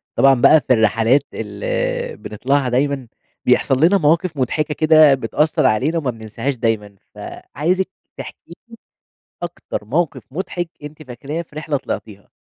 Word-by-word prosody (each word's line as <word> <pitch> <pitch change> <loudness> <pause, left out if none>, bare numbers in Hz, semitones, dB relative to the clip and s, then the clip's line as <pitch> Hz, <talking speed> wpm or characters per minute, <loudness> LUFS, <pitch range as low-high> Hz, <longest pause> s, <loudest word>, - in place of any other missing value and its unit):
طبعًا 135 0 +6
بقى 145 +5 +5
في 130 - +5
الرحلات 115 +4 +3
ال - - -3
بنطلعها 130 +5 -1
دايمًا، 135 +1 0 0.4
بيحصل 135 +2 +3
لنا 195 +4 +4
مواقِف 165 0 +1
مضحكة 150 +4 -1
كده 155 -2 +6
بتأثّر 150 +5 0
علينا 130 +8 +2
وما 140 -6 -1
بننساهاش 115 +4 -4
دايمًا. 110 -4 -2 0.2
فعايزِك 180 +7 -3 0.3
تحكي 170 - -10 0.2
لي 230 - -11 0.7
أكتر 170 -10 -5
موقِف 155 +7 -1
مُضحك 175 +1 -4
أنتِ 150 +1 -9
فاكراه 135 +5 -5
في 160 -3 -16
رحلة 155 -2 -2
طلعتيها؟ 105 -6 -7
145 Hz, 135 wpm, -19 LUFS, 125-160 Hz, 0.7 s, طبعًا